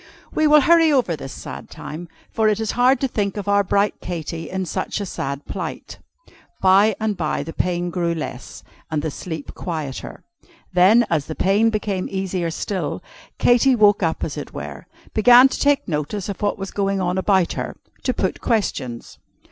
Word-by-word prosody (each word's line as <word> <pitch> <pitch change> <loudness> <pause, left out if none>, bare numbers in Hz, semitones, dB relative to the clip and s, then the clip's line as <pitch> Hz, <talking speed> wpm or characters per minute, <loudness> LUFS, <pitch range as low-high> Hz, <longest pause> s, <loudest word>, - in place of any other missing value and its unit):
We 310 - +3
will 300 0 +7
hurry 330 +1 +5
over 250 - +2
this 135 -3 -9 0.2
time, 165 +4 -8 0.2
for 220 -1 +2
it 210 0 0
is 220 -1 -1
hard 255 +2 +3
to 270 - +2
think 205 -4 -2
of 205 - -5
our 200 0 +3
bright 200 +2 +1
Katy 165 -1 -5
in 190 0 -3
such 175 - -3
a 200 - -3
sad 140 -5 -4
plight. - - -6 0.6
By 195 +3 +5
and 215 -1 -1
by 160 -4 -2
the 165 - -7
pain 175 -1 -1
grew 170 -1 -1
less, 155 - -7 0.3
and 150 -2 -2
the 160 - -2
sleep 160 -1 -7
quieter. 155 -7 -5 0.5
Then, 200 +7 +6
as 155 -4 0
the 155 - -5
pain 205 +4 +3
became 205 -4 -2
easier 190 -3 -2
still, 185 +4 -3 0.3
Katy 245 +2 +4
woke 205 -3 +4
up 165 -3 0
as - - -4
it - - -7
were - - -7 0.3
began 245 +4 +7
to - - -4
take 285 -1 +2
notice 170 +6 -3
of 200 - -5
what 205 -1 0
was 195 -1 -6
going 195 -1 0
on 180 0 0
about 190 -2 +2
her; - - -5 0.2
to - - 0
put - - -2
questions. 140 - -2
195 Hz, 180 wpm, -21 LUFS, 170-215 Hz, 0.6 s, will